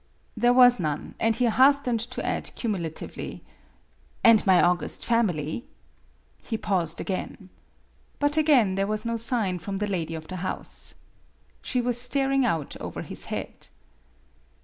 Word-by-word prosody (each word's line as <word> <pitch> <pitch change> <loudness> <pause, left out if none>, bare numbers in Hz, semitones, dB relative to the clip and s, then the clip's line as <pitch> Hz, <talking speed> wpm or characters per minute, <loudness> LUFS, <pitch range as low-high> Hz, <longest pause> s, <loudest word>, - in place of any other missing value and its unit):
There 240 +2 +3
was 245 -2 +6
none, 150 -4 -3
and 225 0 +2
he 250 - +1
hastened 255 0 +3
to 240 +3 -5
add - - -3
cumulatively, 175 -9 -5 0.4
" - - -36
And 230 -2 +6
my 185 -2 +6
august 175 0 +1
family? 205 - 0 0.4
" - - -34
He 225 - -1
paused 175 -6 -1
again. 190 0 -5 0.7
But 290 0 +1
again 285 -11 +4
there 195 +1 0
was 215 +1 -2
no 230 0 -1
sign 225 -6 0
from 195 +3 -5
the 210 - -1
lady 170 -5 -3
of 160 0 -8
the 185 - -6
house. 185 +1 -4 0.7
She 250 - -1
was 245 0 0
staring 270 +1 +1
out 160 -9 -2
over - - -6
his - - -5
head. - - -6
215 Hz, 150 wpm, -26 LUFS, 180-245 Hz, 0.7 s, was